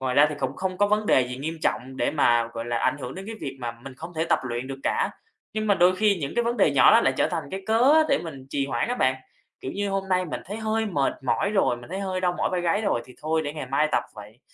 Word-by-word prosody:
Ngoài 130 -1 -1
ra 145 +2 +7
thì - - -3
cũng 135 -1 -3
không 185 -1 -3
có 205 - +4
vấn 210 +1 +1
đề 130 - +5
gì 125 - -5
nghiêm 160 +5 -4
trọng 130 +1 -1
để - - +1
mà, 120 -6 +3
gọi 115 0 -5
là, 120 0 -1
ảnh 130 - +1
hưởng 130 -2 -6
đến 190 +1 -8
cái 225 - -5
việc 135 -1 -5
mà 120 -1 -3
mình 135 -1 -8
không 165 +4 -9
thể 160 0 0
tập - - +3
luyện 120 +1 -3
được 135 0 -6
cả. - - +1 0.4
Nhưng 215 0 -1
mà 205 - +4
đôi 185 0 +4
khi 210 0 +3
những 140 -1 -4
cái 240 - +1
vấn 235 +1 0
đề 195 - +4
nhỏ 135 - +7
đó - - +7
lại 135 - +2
trở - - +2
thành 165 -4 -3
cái 190 0 -5
cớ 230 +6 +4
á 315 - +7
để 275 - +3
mình 140 -6 -8
trì 140 -1 -1
hoãn 140 - -1
á 245 - 0
bạn, 130 - +2 0.5
kiểu, 130 - -5
như 200 0 -2
hôm 195 0 -2
nay 185 -1 +2
mình - - -4
thấy 205 +4 -5
hơi 220 0 -1
mệt 145 -9 0
mỏi 195 +9 +1
rồi, 195 - +2
mình 120 +5 -13
thấy 190 +2 -3
hơi 190 -2 -2
đau 180 -1 +1
mỏi - - 0
vai 180 - 0
gáy 175 +4 +1
rồi 160 - 0
thì 125 - -15
thôi 160 +1 0
để 145 - -3
ngày 150 -3 -6
mai 140 +4 +1
tập - - +2
vậy. 105 +2 -12
160 Hz, 310 wpm, -25 LUFS, 130-200 Hz, 0.5 s, ra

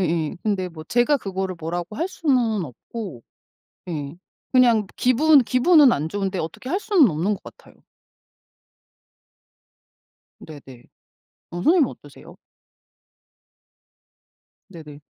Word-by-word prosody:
예예. 165 -4 -1
근데 195 -4 -1
뭐 160 -2 -11
제가 245 - +2
그거를 190 -3 -4
뭐라고 175 +5 -5
할 335 +5 -2
수는 245 - 0
없고. 155 - -9 0.7
예 150 -2 -5 0.4
그냥 240 -5 +4
기분 280 +4 +4
기분은 270 +2 +5
안 150 +3 -2
좋은데 195 +1 -3
어떻게 165 +10 -6
할 375 - 0
수는 355 - +4
없는 170 +7 -1
것 - - -13
같아요. - - -15 2.7
네네. 135 -5 -13 0.7
어 175 - -6
선생님은 320 - +3
어떠세요? - - -14 2.4
네네. 150 -4 -12
195 Hz, 220 characters per minute, -22 LUFS, 165-255 Hz, 2.7 s, 기분은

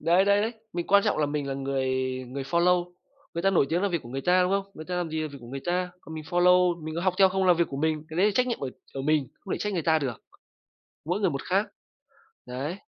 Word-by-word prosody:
Đấy, 175 +3 +4
đấy, 200 0 +4
đấy, 225 - -1 0.2
mình 175 -1 -3
quan 200 0 +5
trọng - - +1
là 150 - +2
mình 145 -1 -2
là 135 - -2
người 135 -1 -1 0.4
người 135 +2 -4
follow. 175 +3 +2 0.4
Người 170 - -2
ta 195 - +4
nổi 175 -7 +3
tiếng 175 +3 0
là 200 - +2
việc 170 -4 -2
của 120 - -11
người 135 +3 -4
ta, 180 +4 +4
đúng 180 - +1
không? 195 0 -1
Người 155 - -8
ta 180 +1 -3
làm 175 -2 -2
gì 160 0 -2
là 155 - -3
việc 140 - -9
của 120 - -12
người 135 +2 -6
ta, 180 +1 0
còn 160 - -10
mình 155 -1 -6
follow, 175 0 +3
mình 155 0 -5
có 170 - -2
học 185 -1 +2
theo 190 -1 +7
không 190 0 0
là 180 - +7
việc 170 0 +1
của 135 - -6
mình, 155 +1 0
cái 160 - -7
đấy 195 +3 +4
là 210 - +2
trách 255 - +3
nhiệm 240 - -2
ở 135 - -2 0.3
ở 135 - -3
mình, 150 -2 +1
không 195 - -6
thể - - -4
trách 210 - -2
người 175 -4 -1
ta 160 0 +3
được, 130 -6 -4 0.8
mỗi 175 +5 -1
người 195 -4 +2
một 135 -2 -4
khác, 195 +3 +1 0.8
đấy. 140 +8 -4
170 Hz, 295 wpm, -27 LUFS, 145-185 Hz, 0.8 s, theo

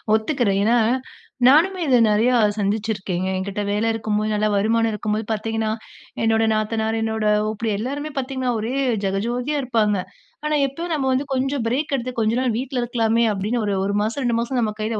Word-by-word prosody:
ஒத்துக்கிறேன். 220 -3 +1
ஏன்னா, 235 +3 +3 0.7
நானுமே 345 +7 +5
இத 255 -2 +5
நிறையா 230 +4 +3 0.2
சந்திச்சுருக்கேங்க. 200 -3 -1
என்கிட்ட 200 +2 -3
வேல 210 +2 0
இருக்கும்போது, 215 -1 -1
நல்லா 210 0 +1
வருமானம் 225 +3 +2
இருக்கும்போது 210 +1 -2
பார்த்தீங்கன்னா 220 0 -1 0.5
என்னோட 225 0 +3
நாத்தனார், 220 +1 -1
என்னோட 220 -1 -1 0.2
ஓப்பிடியா, 215 0 -2
எல்லாருமே 285 +6 -4
பார்த்தீங்கன்னா, 260 -1 -1
ஒரே 230 +4 -3 0.3
ஜகஜோதியா 240 +9 -1
இருப்பாங்க. 220 -5 +1 0.5
ஆனா, 300 0 +1
எப்ப 330 +6 -6
நாம 280 -4 0
வந்து 265 +2 0
கொஞ்சம் 265 0 -1
பிரேக் 285 +6 -1
எடுத்து 255 -1 -3
கொஞ்ச 220 0 +2
நாள் 250 -4 0
வீட்ல 255 0 -2
இருக்கலாமே 230 -1 +1
அப்பிடின்னு 215 +4 -1
ஒரு 200 -1 0
1 200 - -1
மாசம், 230 +6 -2
2 235 -1 +1
மாசம் 240 +2 -1
நம்ம 215 -2 0
கையில 215 0 -2
225 Hz, 165 wpm, -22 LUFS, 215-255 Hz, 0.7 s, நானுமே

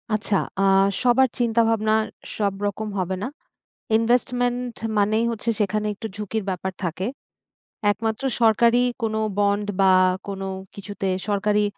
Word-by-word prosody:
আচ্ছা, 210 -1 -1 0.3
আ - - +3 0.4
সবার 255 +1 +5
চিন্তাভাবনা 225 -2 +2 0.4
সবরকম 205 +1 -2
হবে 185 +1 -1
না। - - -1 0.7
investment 245 +1 0 0.2
মানেই 215 +3 +2
হচ্ছে 230 +1 -3
সেখানে 210 +1 0
একটু 220 +2 -6
ঝুঁকির 210 +1 -3
ব্যাপার 190 0 -3
থাকে 180 +3 -2 0.9
একমাত্র 220 +3 -3 0.2
সরকারি 235 +2 +5 0.2
কোন 220 -1 0 0.2
বন্ড 205 0 +2
বা 190 -1 +6 0.4
কোন 195 -1 -5 0.3
কিছুতে 200 -1 -5 0.2
সরকারি 210 +1 +2
215 Hz, 115 wpm, -23 LUFS, 200-230 Hz, 0.9 s, বা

